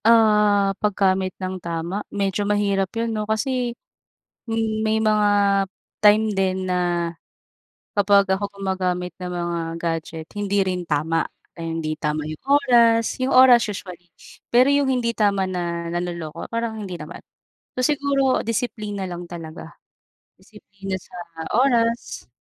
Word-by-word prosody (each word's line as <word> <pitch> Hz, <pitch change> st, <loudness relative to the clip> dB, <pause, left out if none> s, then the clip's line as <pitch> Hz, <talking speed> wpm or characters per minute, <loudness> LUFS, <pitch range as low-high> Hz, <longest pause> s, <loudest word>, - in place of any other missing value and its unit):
Ah, 210 Hz, -3 st, +5 dB
paggamit 190 Hz, -2 st, +2 dB
ng 185 Hz, -1 st, -5 dB
tama, 170 Hz, +4 st, -3 dB
medyo 200 Hz, 0 st, -1 dB
mahirap 200 Hz, -2 st, +1 dB
'yun 230 Hz, 0 st, -1 dB
'no 215 Hz, 0 st, -3 dB
kasi, 245 Hz, +1 st, -1 dB, 0.7 s
hmm, 225 Hz, -1 st, -1 dB
may 220 Hz, 0 st, +1 dB
mga 215 Hz, -1 st, +3 dB, 0.7 s
time 215 Hz, +1 st, +5 dB
din 190 Hz, -1 st, 0 dB
na, 180 Hz, -1 st, 0 dB, 1.2 s
kapag 200 Hz, 0 st, +5 dB
ako 200 Hz, +1 st, -1 dB
gumagamit 185 Hz, -2 st, -2 dB
ng 180 Hz, -, -4 dB
mga 175 Hz, -1 st, -2 dB, 0.2 s
gadget 165 Hz, -1 st, -3 dB
hindi 200 Hz, -1 st, +1 dB
rin 180 Hz, -1 st, -2 dB
tama. 160 Hz, +3 st, 0 dB, 0.3 s
Eh, 165 Hz, -1 st, -6 dB
hindi 165 Hz, -1 st, -2 dB
tama 150 Hz, 0 st, -1 dB
yung 155 Hz, 0 st, -7 dB
oras, 240 Hz, -5 st, +4 dB
yung 255 Hz, +1 st, 0 dB
oras 255 Hz, -2 st, +7 dB
usually, 180 Hz, -3 st, -7 dB, 0.4 s
pero 250 Hz, +3 st, +5 dB
yung 285 Hz, -1 st, +2 dB
hindi 240 Hz, -2 st, 0 dB
tama 200 Hz, -4 st, +1 dB
na 170 Hz, -2 st, -3 dB
nanloloko 170 Hz, -2 st, -4 dB
parang 230 Hz, -1 st, -2 dB
hindi 190 Hz, -4 st, -5 dB
naman. 155 Hz, +1 st, -9 dB, 0.6 s
So 255 Hz, -, 0 dB
siguro 280 Hz, -2 st, +2 dB
disiplina 215 Hz, -3 st, -3 dB
lang 175 Hz, 0 st, -6 dB
talaga, 165 Hz, -2 st, -9 dB, 0.6 s
disiplina 200 Hz, -2 st, -8 dB
sa -, -, -16 dB, 0.4 s
oras, 235 Hz, -3 st, +1 dB
200 Hz, 130 wpm, -22 LUFS, 180-225 Hz, 1.2 s, oras